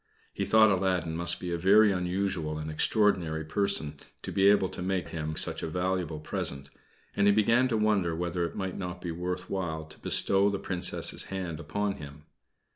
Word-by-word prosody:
He -, -, -2 dB
thought 110 Hz, -1 st, +5 dB
Aladdin 90 Hz, -4 st, 0 dB
must 85 Hz, +1 st, 0 dB
be 90 Hz, -, -5 dB
a 85 Hz, -, -2 dB
very 105 Hz, +4 st, +5 dB
unusual 90 Hz, -4 st, -2 dB
and 75 Hz, 0 st, -5 dB
extraordinary 85 Hz, -3 st, +1 dB
person 80 Hz, -5 st, -1 dB, 0.2 s
to -, -, -5 dB
be 95 Hz, 0 st, +3 dB
able 100 Hz, -2 st, +4 dB
to -, -, -7 dB
make 90 Hz, -3 st, -2 dB
him 80 Hz, -1 st, -4 dB
such -, -, +1 dB
a -, -, -3 dB
valuable 90 Hz, -2 st, -2 dB
present, 70 Hz, -2 st, -3 dB, 0.4 s
and 100 Hz, 0 st, +3 dB
he -, -, +7 dB
began 115 Hz, +5 st, +3 dB
to 115 Hz, -3 st, 0 dB
wonder 100 Hz, -6 st, +1 dB
whether 85 Hz, +1 st, -2 dB
it 85 Hz, -, -4 dB
might 95 Hz, -2 st, -4 dB
not 90 Hz, -1 st, -5 dB
be 90 Hz, -1 st, -5 dB
worth 90 Hz, +2 st, -4 dB
while 80 Hz, -5 st, -3 dB
to 80 Hz, -, -12 dB
bestow 100 Hz, +1 st, +2 dB
the 100 Hz, -, -2 dB
Princess's 90 Hz, -2 st, 0 dB
hand 90 Hz, -5 st, -5 dB
upon 100 Hz, +5 st, -2 dB
him. 75 Hz, 0 st, -11 dB
90 Hz, 190 wpm, -28 LUFS, 80-100 Hz, 0.4 s, he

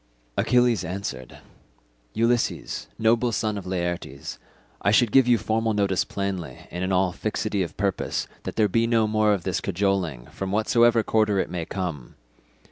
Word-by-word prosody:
Achilles 120 Hz, -5 st, +3 dB
answered, 85 Hz, -9 st, -5 dB, 0.8 s
"Ulysses, 115 Hz, +1 st, 0 dB
noble 115 Hz, +2 st, +2 dB
son 110 Hz, -1 st, -1 dB
of 95 Hz, -2 st, -6 dB
Laertes, 85 Hz, -6 st, -4 dB, 0.4 s
I 100 Hz, -, +2 dB
should 110 Hz, +1 st, +4 dB
give 130 Hz, 0 st, +5 dB
you 120 Hz, -1 st, +5 dB
formal 110 Hz, +1 st, 0 dB
notice 100 Hz, -2 st, +1 dB
plainly 95 Hz, -9 st, -4 dB
and 90 Hz, +2 st, -4 dB
in 95 Hz, -, -1 dB
all 95 Hz, -1 st, +2 dB
fixity 105 Hz, 0 st, -2 dB
of 85 Hz, -, -4 dB
purpose 100 Hz, -1 st, -1 dB
that -, -, -6 dB
there 110 Hz, -2 st, +3 dB
be 115 Hz, +4 st, +1 dB
no 115 Hz, -2 st, +3 dB
more 110 Hz, 0 st, +2 dB
of 100 Hz, -4 st, 0 dB
this 95 Hz, -1 st, -1 dB
cajoling, 90 Hz, -9 st, -1 dB
from 95 Hz, -1 st, -4 dB
whatsoever 115 Hz, +2 st, +3 dB
quarter 110 Hz, -2 st, +2 dB
it 95 Hz, -, -1 dB
may 85 Hz, -2 st, -3 dB
come. 85 Hz, -10 st, -5 dB
100 Hz, 160 wpm, -25 LUFS, 90-110 Hz, 0.8 s, give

